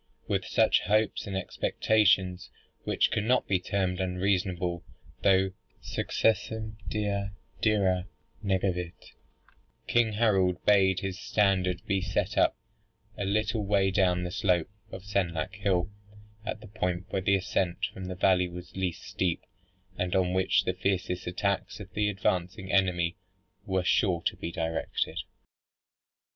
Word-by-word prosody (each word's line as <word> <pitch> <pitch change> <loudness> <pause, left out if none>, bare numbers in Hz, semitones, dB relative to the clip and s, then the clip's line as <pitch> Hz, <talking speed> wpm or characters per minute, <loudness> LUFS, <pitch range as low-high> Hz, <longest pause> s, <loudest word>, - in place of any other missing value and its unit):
With - - 0
such - - +3
hopes 105 +1 +1
and 95 -1 -2
expectations 95 -2 +1 0.4
(which - - +2
cannot 115 +4 +2
be 95 -2 +2
termed 95 -1 -1
unreasonable, 90 -1 0 0.4
though 95 -1 +4 0.3
"Successum 110 0 0
Dea 100 0 -1 0.3
dira 95 -4 +2 0.4
negavit,") 95 -3 -2 0.7
King 120 -2 +2
Harold 95 -5 +3
bade 95 -2 +4
his 95 -1 -4
standard 95 -2 +1
be 100 -3 +1
set 90 0 -1
up - - +3 0.6
a 100 - -3
little 105 +2 0
way 100 -1 +2
down 90 -2 +2
the 90 - -3
slope 90 -2 +1 0.2
of 95 - -8
Senlac 95 -3 -1
hill, 95 -2 0 0.5
at 110 - -4
the 110 - -11
point 90 -3 -2
where 95 - 0
the 100 +1 +3
ascent 90 -1 0
from 95 - -7
the 90 0 -4
valley 90 -1 +3
was 90 0 -10
least 95 -2 -2
steep, 90 -1 -1 0.6
and 90 0 0
on 90 -1 +2
which 95 0 +3
the 90 - 0
fiercest 90 -1 -1
attacks 100 +4 -1
of 95 -2 -10
the 105 +1 +1
advancing 95 -1 -1
enemy 90 -3 +2 0.5
were 95 -1 +1
sure 90 -1 +2
to - - +1
be 85 - -5
directed. 80 -1 -2
95 Hz, 135 wpm, -29 LUFS, 90-100 Hz, 0.7 s, though